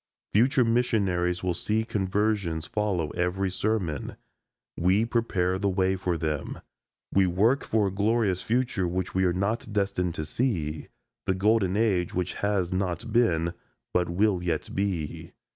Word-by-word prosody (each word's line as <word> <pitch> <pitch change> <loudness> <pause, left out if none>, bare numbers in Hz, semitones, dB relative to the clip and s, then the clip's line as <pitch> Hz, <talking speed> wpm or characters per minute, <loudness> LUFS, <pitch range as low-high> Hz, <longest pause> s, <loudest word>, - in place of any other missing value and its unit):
Future 125 +3 +4
missionaries 100 -7 +1
will 90 -1 +1
see 110 +6 -1
conversions 100 -5 0
follow 95 -6 -1
every 90 +2 -1
sermon. 95 - -2 0.6
We 95 +6 +2
prepare 95 -6 0
the 100 0 +1
way 95 0 +1
for 90 -2 -1
them. 75 -3 -3 0.5
We 95 -1 +4
work 110 +10 +2
for 110 -2 +1
a 95 - 0
glorious 100 -1 +1
future 120 -6 0
which 90 +1 -2
we 95 0 +2
are 90 - +3
not 105 +5 -1
destined 100 -4 0
to 75 - -3
see 80 - -2 0.4
the 95 - +2
golden 100 -1 +2
age 95 -6 +1
which 90 0 -1
has 100 -4 0
not 95 +3 -2
been, 85 -8 +2 0.4
but 90 -1 +1
will 95 +1 +2
yet 85 -3 -2
be. 95 -6 -3
95 Hz, 145 wpm, -27 LUFS, 90-105 Hz, 0.6 s, Future